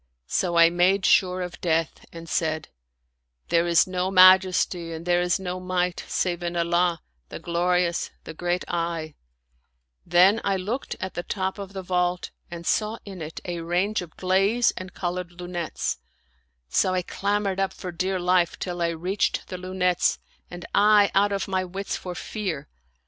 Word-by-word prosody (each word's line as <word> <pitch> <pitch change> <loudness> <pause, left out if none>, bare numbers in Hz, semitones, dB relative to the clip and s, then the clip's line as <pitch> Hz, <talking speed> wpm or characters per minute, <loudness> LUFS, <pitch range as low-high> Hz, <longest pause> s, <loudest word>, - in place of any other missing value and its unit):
So 175 - 0
I 170 0 +7
made 185 +3 +3
sure 185 -1 +3
of 180 0 -8
death, 165 -2 -1
and 165 0 -10
said, 155 -1 -1 0.4
" - - -47
There 170 0 +3
is 170 -1 +5
no 185 0 -2
Majesty 185 -2 +5
and 165 +1 -7
there 175 0 +2
is 180 +2 +1
no 185 -1 -4
Might 180 -1 -1
save 175 -1 -1
in 175 0 -3
Allah, 170 0 +1 0.3
the - - -7
Glori 175 +1 +1
ous, 170 - -3
the - - -8
Great 175 +2 -2
1 165 -2 -2 0.4
'* 60 0 -48
Then 185 +5 +5
I 195 -1 +1
looked 215 +8 -4
at 185 0 -4
the - - -3
top 190 +2 -3
of 200 0 -7
the 190 -1 -5
vault 180 0 -1 0.2
and 170 0 -8
saw 215 +4 0
in 190 -4 -8
it 155 +1 -7
a 175 -2 -4
range 180 +5 0
of 170 -3 -11
glaze 195 +6 +2
and 185 0 -7
colored 175 -1 -4
lunettes; 175 -2 -3 0.7
so 185 - +1
I 180 - 0
clam 205 +3 -1
bered 195 -1 -2
up 195 0 +1
for 180 - -7
dear 185 +2 -1
life, 180 -1 +2
till 175 -1 -4
I 170 - +2
reached 180 +5 -1
the 185 - -5
lunettes, 180 -1 +1 0.3
and 175 -1 -8
I 205 -1 +5
out 205 +1 +3
of 195 -1 -2
my 190 -1 0
wits 190 +2 -4
for 180 -1 -6
fear. 175 -9 -4
180 Hz, 180 wpm, -25 LUFS, 170-190 Hz, 0.7 s, I